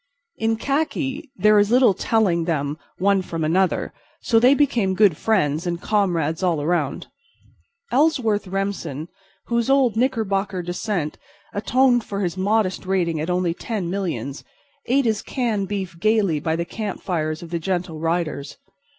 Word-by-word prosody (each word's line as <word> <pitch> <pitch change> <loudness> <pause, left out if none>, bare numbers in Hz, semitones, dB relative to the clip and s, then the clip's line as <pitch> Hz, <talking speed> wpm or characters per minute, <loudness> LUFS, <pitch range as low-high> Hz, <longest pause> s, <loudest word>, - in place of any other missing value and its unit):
In 225 0 +1
khaki 280 +3 -2
there 210 +1 +5
is 205 0 +3
little 245 -3 +5
telling 185 -6 +1
them 150 -2 -2 0.2
one 195 +1 +3
from 165 -3 -4
another, 180 +4 +1 0.3
so 225 -2 +3
they 255 +4 +6
became 235 -10 +1
good 200 -5 +5
friends 165 -4 0
and 170 -1 -2
comrades 175 -6 0
all 175 -4 +1
around. 150 -2 -1 0.9
Ellsworth 245 -9 +2
Remsen, 190 -6 -3 0.4
whose 235 +1 0
old 270 -5 +3
Knickerbocker 205 -6 0
descent 175 -2 -3 0.3
atoned 245 +3 +3
for 200 -1 -4
his 175 -3 -1
modest 195 -1 0
rating 170 -5 0
at 160 - -3
only 180 -1 +1
ten 190 -2 -4
millions, 150 - -3 0.4
ate 270 +2 +2
his 220 -2 +1
canned 225 -7 -1
beef 190 -3 -4
gayly 205 -6 +2
by 160 +2 -1
the 170 +1 -2
campfires 170 -6 -3
of 170 - -10
the 170 - -1
Gentle 175 -2 -2
Riders. 165 -3 -2
190 Hz, 145 wpm, -22 LUFS, 170-220 Hz, 0.9 s, they